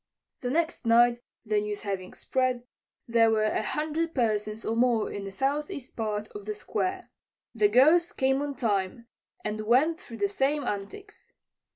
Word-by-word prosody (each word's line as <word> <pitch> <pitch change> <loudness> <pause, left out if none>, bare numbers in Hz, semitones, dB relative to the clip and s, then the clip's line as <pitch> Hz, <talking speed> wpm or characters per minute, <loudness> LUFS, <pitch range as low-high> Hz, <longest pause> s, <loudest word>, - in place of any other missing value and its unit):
The 245 - -3
next 325 +4 0
night, 240 +1 +5 0.3
the 210 -1 +1
news 210 0 -4
having 195 -3 -4
spread, 255 -2 0 0.4
there 230 -1 +4
were 220 -1 +2
a 215 - +1
hundred 310 +7 -2
persons 215 -3 0
or 225 - 0
more 235 -2 +2
in 200 -1 -5
the 195 - -6
southeast 280 - -2
part 215 -2 -2
of 205 -1 -9
the 215 0 -3
Square. 370 - -3 0.4
The 215 -3 +4
Ghost 305 +10 +4
came 265 +1 +2
on 285 -1 -3
time 215 -2 -1 0.4
and 215 0 -2
went 270 +10 +3
through 230 -11 -10
the 205 -1 +1
same 275 +8 0
antics. 410 - -6
235 Hz, 165 wpm, -28 LUFS, 210-290 Hz, 0.4 s, night